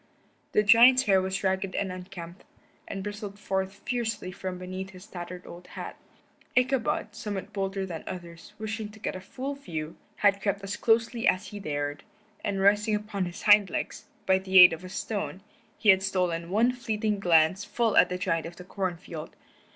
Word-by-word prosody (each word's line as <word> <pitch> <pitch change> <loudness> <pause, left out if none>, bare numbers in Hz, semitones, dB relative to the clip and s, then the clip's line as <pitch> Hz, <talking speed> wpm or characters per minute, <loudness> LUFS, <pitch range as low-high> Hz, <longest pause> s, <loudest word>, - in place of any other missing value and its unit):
The 210 - +4
giant's 245 +5 +7
hair 195 -4 +4
was 190 +1 -3
ragged 190 0 0
and 195 -2 -1
unkempt, 180 -1 -9 0.4
and 195 -1 -5
bristled 205 0 -6
forth 195 0 -3
fiercely 225 -6 -2
from 185 0 -5
beneath 185 +1 -6
his 185 0 -13
tattered 180 -3 -8
old 175 +1 -11
hat. - - -6 0.6
Ichabod, 250 -4 +1
somewhat 210 -1 -5
bolder 195 -1 -2
than 170 -4 -6
others, 170 +1 -8
wishing 220 0 -4
to 220 - -14
get - - -3
a 185 - -6
full 265 +8 -5
view, 165 - -6 0.2
had 200 -1 +3
crept 200 0 -1
as 195 +1 -3
closely 230 +1 +2
as 185 +2 +2
he 205 - -7
dared, 145 -4 -3 0.4
and 195 -1 -1
rising 210 +2 +4
upon 210 -2 -2
his 175 0 -7
hind 205 -2 +6
legs, - - -4 0.2
by 190 0 +4
the 190 0 +1
aid 180 -2 +11
of 165 +2 -7
a 185 - -8
stone, 195 -1 -4 0.3
he 215 - +2
had 190 -1 +7
stolen 180 -3 -1
one 225 +6 +3
fleeting 220 -4 -2
glance 175 +1 +4
full 220 +1 0
at - - +6
the 180 - -2
giant 165 -3 -1
of 170 - -10
the 180 - -10
corn 185 -1 -3
field. 160 -2 -9
195 Hz, 185 wpm, -28 LUFS, 180-210 Hz, 0.6 s, aid